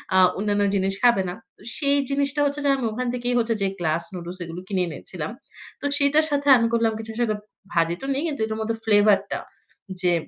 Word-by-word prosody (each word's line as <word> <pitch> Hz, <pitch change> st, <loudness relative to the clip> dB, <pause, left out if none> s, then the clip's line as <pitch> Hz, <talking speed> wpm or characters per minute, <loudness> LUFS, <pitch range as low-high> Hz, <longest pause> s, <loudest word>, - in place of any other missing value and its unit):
আ -, -, +6 dB, 0.2 s
অন্যান্য 205 Hz, 0 st, +1 dB
জিনিস 195 Hz, 0 st, +1 dB
খাবে 235 Hz, -5 st, +5 dB
না। -, -, -4 dB, 0.2 s
তো -, -, -23 dB, 0.2 s
সেই 285 Hz, -1 st, +2 dB
জিনিসটা 280 Hz, +1 st, 0 dB
হচ্ছে 285 Hz, +1 st, 0 dB
যে -, -, +4 dB
আমি 250 Hz, -, -2 dB
ওখান 250 Hz, +3 st, -3 dB
থেকেই 245 Hz, 0 st, -1 dB
হচ্ছে 230 Hz, 0 st, +1 dB
যে, 195 Hz, -, +2 dB
গ্লাস 165 Hz, 0 st, 0 dB
নুডলস 175 Hz, 0 st, -6 dB
এগুলো 170 Hz, +1 st, -7 dB
কিনে 190 Hz, -3 st, 0 dB
এনেছিলাম। 160 Hz, +2 st, -5 dB, 0.5 s
তো -, -, -5 dB
সেটার 290 Hz, +2 st, +4 dB
সাথে 285 Hz, 0 st, 0 dB
আমি 230 Hz, -1 st, +2 dB
করলাম 230 Hz, -1 st, +2 dB
কিছু 225 Hz, 0 st, -6 dB
সাতে 220 Hz, -3 st, +1 dB, 0.4 s
ভাজি 170 Hz, 0 st, +2 dB
তো -, -, -5 dB
নেই, 275 Hz, -, -1 dB
কিন্তু 285 Hz, -7 st, -3 dB
এটার 220 Hz, 0 st, -4 dB
মধ্যে 225 Hz, +1 st, -1 dB
ফ্লেভার 205 Hz, -2 st, +5 dB
টা -, -, -1 dB, 0.6 s
যে 175 Hz, -1 st, +3 dB
220 Hz, 210 wpm, -24 LUFS, 185-265 Hz, 0.6 s, আ